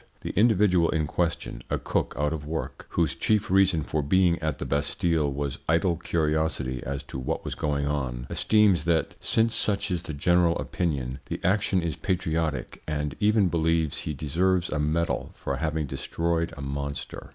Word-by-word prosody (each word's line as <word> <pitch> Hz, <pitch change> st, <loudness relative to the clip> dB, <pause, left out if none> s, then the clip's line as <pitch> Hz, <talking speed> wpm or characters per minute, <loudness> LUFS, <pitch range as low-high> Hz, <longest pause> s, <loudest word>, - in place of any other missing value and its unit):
"The -, -, -4 dB
individual 100 Hz, -5 st, +4 dB
in 80 Hz, -2 st, +1 dB
question, 85 Hz, +2 st, -2 dB
a -, -, +1 dB
cook -, -, -1 dB
out 75 Hz, +1 st, +1 dB
of 75 Hz, -2 st, -4 dB
work, 80 Hz, +2 st, -5 dB
whose 85 Hz, -4 st, +1 dB
chief 105 Hz, -3 st, +1 dB
reason 95 Hz, -5 st, +4 dB
for 75 Hz, +2 st, -1 dB
being 85 Hz, +4 st, +3 dB
at 80 Hz, -3 st, -2 dB
the -, -, -5 dB
Bastille 75 Hz, +1 st, 0 dB
was 70 Hz, 0 st, -3 dB
idle 85 Hz, +2 st, +3 dB
curiosity 80 Hz, -5 st, -1 dB
as 70 Hz, +1 st, -4 dB
to 65 Hz, -, -7 dB
what 65 Hz, -, -3 dB
was -, -, -3 dB
going 70 Hz, -1 st, -1 dB
on, 65 Hz, -4 st, -2 dB
esteems, 105 Hz, -7 st, +3 dB
that 85 Hz, -1 st, +1 dB
since 115 Hz, 0 st, +2 dB
such 100 Hz, -3 st, 0 dB
is 90 Hz, -, 0 dB
the 80 Hz, -, -6 dB
general 85 Hz, +3 st, +3 dB
opinion, 70 Hz, -7 st, -2 dB
the -, -, -4 dB
action 95 Hz, -1 st, +2 dB
is 85 Hz, -2 st, -2 dB
patriotic 80 Hz, -7 st, -2 dB
and 75 Hz, -2 st, -2 dB
even 105 Hz, -1 st, +4 dB
believes 80 Hz, -2 st, +1 dB
he 75 Hz, -, -4 dB
deserves 90 Hz, +5 st, +1 dB
a 75 Hz, -, -1 dB
medal 80 Hz, +3 st, 0 dB
for -, -, -3 dB
having 80 Hz, -1 st, -1 dB
destroyed 85 Hz, +4 st, -1 dB
a 70 Hz, -, -6 dB
monster. 70 Hz, +1 st, -5 dB
80 Hz, 175 wpm, -26 LUFS, 75-90 Hz, -, individual